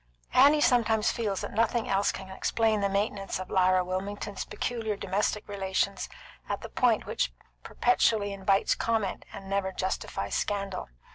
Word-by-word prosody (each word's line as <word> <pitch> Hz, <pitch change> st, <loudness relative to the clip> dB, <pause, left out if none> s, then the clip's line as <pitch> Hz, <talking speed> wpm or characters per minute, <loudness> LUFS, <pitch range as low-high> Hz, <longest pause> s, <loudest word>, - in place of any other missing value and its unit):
Annie 290 Hz, +3 st, +6 dB
sometimes 230 Hz, -4 st, +3 dB
feels 210 Hz, -5 st, -2 dB
that -, -, -5 dB
nothing 230 Hz, +2 st, +1 dB
else 195 Hz, +1 st, +2 dB
can 190 Hz, -, -8 dB
explain 215 Hz, +2 st, +1 dB
the 200 Hz, -, +1 dB
maintenance 200 Hz, 0 st, -1 dB
of 185 Hz, 0 st, -7 dB
Lyra 185 Hz, -1 st, +4 dB
Wilmington's 195 Hz, +2 st, -4 dB
peculiar 225 Hz, -3 st, -2 dB
domestic 205 Hz, +1 st, -1 dB
relations 195 Hz, 0 st, -1 dB, 0.4 s
at -, -, -2 dB
the -, -, -7 dB
point -, -, +2 dB
which -, -, -1 dB, 0.3 s
perpetually 220 Hz, -4 st, +2 dB
invites 195 Hz, 0 st, +2 dB
comment 220 Hz, -4 st, -1 dB
and 195 Hz, -, -9 dB
never 195 Hz, -1 st, 0 dB
justifies 185 Hz, -, -3 dB
scandal. 200 Hz, -, -2 dB
200 Hz, 145 wpm, -28 LUFS, 195-220 Hz, 0.4 s, Annie